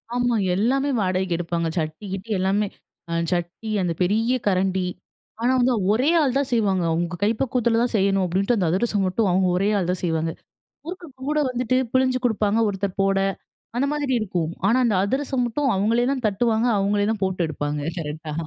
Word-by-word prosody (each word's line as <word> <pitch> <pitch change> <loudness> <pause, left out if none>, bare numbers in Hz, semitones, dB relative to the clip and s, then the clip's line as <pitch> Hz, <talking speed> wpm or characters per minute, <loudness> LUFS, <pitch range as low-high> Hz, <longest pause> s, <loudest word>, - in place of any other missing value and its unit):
ஆமா. 245 -1 +1 0.2
எல்லாமே 270 +7 +1
வாடகைக்கு 185 -2 0
எடுப்பாங்க. 170 -1 -2
சட்டி 155 +5 -3
கிட்டி 195 +3 -6
அ - - +1
எல்லாமே. 200 +2 +1 0.4
அ - - -3 0.2
சட்டி 175 +5 -4
அந்த 175 -2 0
பெரிய 225 +7 +2
கரண்டி. 190 -1 +1 0.6
ஆனா 245 - +2
வந்து, 250 +1 +3 0.2
ஒரே 255 +8 +2
ஆள் 270 -3 +1
தான் 275 -1 0
செய்வாங்க. 200 -6 +2
அவுங்க 170 +1 -1
கை 215 - +4
பக்குவத்தில 240 -3 +1
தான் 245 - -2
செய்யணும் 195 -1 +2
அப்படின்ட்டு, 195 +6 +1
அந்த 180 -5 +1
அதிரசம் 200 +1 +1
மட்டும் 195 +3 +1
அவுங்க 185 +1 +2
ஒரே 195 +3 +1
ஆள் 180 -2 -2
தான் 180 - -3
செய்வாங்க. 160 -1 0 0.6
முறுக்கு 355 0 -7 0.2
கூட 300 0 +1
வந்துட்டு 250 0 -1 0.2
பிழிஞ்சு 260 0 +3
கொடுப்பாங்க, 215 -1 +1
ஒருத்தர் 195 -1 -3
போட 195 0 +2 0.6
அந்த 275 - +2
மாதிரி 290 -3 -1
இருக்கும். 175 -6 -2 0.2
ஆனா, 230 - +4
அந்த 225 - +2
அதிரசம் 265 +3 -1
மட்டும் 270 +4 -1
அவங்களே 225 +5 +2
தான் 260 -3 -4
தட்டுவாங்க 220 +3 +1
அவங்களே 205 +1 +1
தான் 215 - -6
போட்டு 190 -1 -2
எடுப்பாங்க, 145 -1 -3 0.2
கரெக்டா? 155 0 -5
205 Hz, 180 wpm, -23 LUFS, 185-245 Hz, 0.6 s, கை